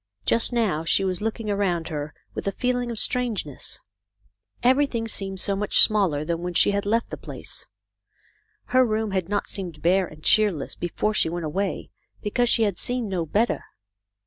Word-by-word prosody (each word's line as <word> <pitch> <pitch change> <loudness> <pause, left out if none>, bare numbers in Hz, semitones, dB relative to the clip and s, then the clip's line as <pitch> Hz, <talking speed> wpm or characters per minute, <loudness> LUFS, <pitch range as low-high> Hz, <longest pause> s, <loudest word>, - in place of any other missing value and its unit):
Just 230 - +3
now 215 -10 0
she 165 +4 +2
was 185 -1 -1
looking 225 0 -3
around 180 -5 0
her 150 -1 -5 0.2
with - - -5
a - - +2
feeling 245 +1 -1
of 230 - -4
strangeness. 215 - +1 0.8
Every 260 +4 +4
thing 230 -4 -3
seemed 195 -3 -3
so 200 +2 0
much 205 +1 0
smaller 190 -9 +3
than 170 +1 -1
when 175 0 -4
she 190 - +5
had 200 0 -1
left 230 +3 0
the - - -4
place. - - -8 1.1
Her 255 0 +6
room 220 -2 -1
had 190 -2 -1
not 205 -1 0
seemed 175 -7 -6
bare 185 +2 +3
and 155 0 -15
cheerless 205 -10 +3
before 195 +5 -2
she 165 - +2
went 170 0 -4
away, 190 +6 -3 0.3
because 240 +3 0
she 230 - +4
had 200 -5 0
seen 245 -3 -2
no 175 -4 -2
better. 215 +9 +1
200 Hz, 180 wpm, -24 LUFS, 175-225 Hz, 1.1 s, Her